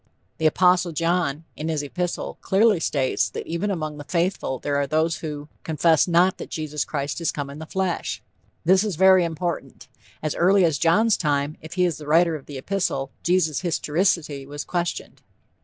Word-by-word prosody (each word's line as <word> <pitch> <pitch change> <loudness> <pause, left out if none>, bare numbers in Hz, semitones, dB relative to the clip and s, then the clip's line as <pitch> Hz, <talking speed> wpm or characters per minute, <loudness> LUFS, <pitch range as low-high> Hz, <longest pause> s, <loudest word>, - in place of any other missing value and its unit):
The 160 - +4
Apostle 180 +1 +3
John, 165 -2 0
in 155 +2 -4
his 155 -2 -1
epistle, 175 +4 -4
clearly 205 -1 +3
states 135 -4 0
that - - -6
even 170 +5 -2
among 155 -5 -3
the - - -6
faithful 170 -4 -1
there 145 +3 -2
were 140 0 0
those 160 +3 +1
who 150 -2 -6
confess 160 +1 +2
not 180 +2 +3
that - - -7
Jesus 150 -2 -3
Christ 145 +2 -3
is 165 - +1
come 140 -1 -5
in 145 - -9
the 160 - -8
flesh. 190 -1 -2 0.5
This 185 +3 +5
is 210 -5 -2
very 190 +1 +6
important. 170 +1 -4 0.4
As 155 - -1
early 190 +1 +4
as 155 -5 +1
John's 210 - +3
time, 145 0 0
if 160 - -9
he 180 -1 +2
is 170 -4 -1
the 150 - -9
writer 165 +2 +4
of 145 - -9
the 145 - -7
epistle, 135 -4 -2
Jesus' 175 -4 +1
historicity 160 -4 0
was 145 +1 -5
questioned. 175 -1 -3
165 Hz, 185 wpm, -23 LUFS, 150-180 Hz, 0.5 s, very